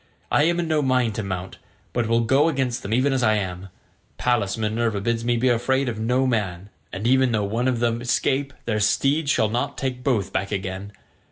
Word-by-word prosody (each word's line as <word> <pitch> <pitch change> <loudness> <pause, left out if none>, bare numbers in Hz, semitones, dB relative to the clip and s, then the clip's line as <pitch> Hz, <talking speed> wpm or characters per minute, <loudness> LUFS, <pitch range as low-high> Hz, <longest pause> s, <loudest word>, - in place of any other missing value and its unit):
I 150 - +4
am 170 +1 +1
in 170 - -1
no 155 -1 +2
mind 130 -4 +1
to 110 - -3
mount, 95 -1 -5 0.3
but 120 -2 0
will 115 +1 +2
go 135 +7 +3
against 130 -5 -1
them 100 - -6
even 130 +4 +2
as 130 - +1
I 110 -2 +3
am; 95 -2 -4 0.5
Pallas 115 -6 0
Minerva 110 0 -1
bids 115 +2 -1
me 120 0 +1
be 125 +3 +1
afraid 130 +3 +1
of 115 -3 -3
no 125 +4 +1
man, 100 -6 -2 0.2
and 95 +4 -5
even 130 0 +4
though 105 -2 +1
one 115 +5 -1
of 125 -2 0
them 115 0 0
escape, 130 +3 0
their 110 -2 0
steeds 140 +8 +2
shall 110 -6 +2
not 120 +3 -2
take 125 -2 -3
both 120 -8 0
back 95 - -2
again. 95 0 -4
120 Hz, 210 wpm, -23 LUFS, 105-130 Hz, 0.5 s, I